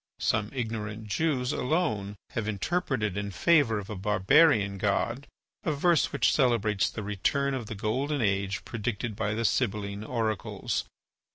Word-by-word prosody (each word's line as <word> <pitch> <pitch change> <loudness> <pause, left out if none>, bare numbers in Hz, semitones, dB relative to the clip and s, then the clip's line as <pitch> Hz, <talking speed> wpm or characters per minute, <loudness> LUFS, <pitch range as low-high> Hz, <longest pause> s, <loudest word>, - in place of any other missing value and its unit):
Some 110 -1 0
ignorant 110 -4 -4
Jews 130 +2 0
alone 110 - -1 0.2
have 110 -2 -3
interpreted 110 - -1
in 100 0 -2
favour 115 - +3
of 100 -2 -5
a 105 - -5
barbarian 105 - +3
god 105 +7 0 0.4
a 160 - 0
verse 160 +2 +2
which 120 -6 +2
celebrates 110 -7 +2
the 110 - -6
return 120 +8 0
of 125 -5 -4
the 110 - -5
golden 130 +8 -1
age 100 -3 0
predicted 110 0 -3
by 105 0 -1
the 115 +1 -1
Sibylline 100 -3 0
oracles. 110 -4 -2
110 Hz, 145 wpm, -28 LUFS, 100-130 Hz, 0.4 s, favour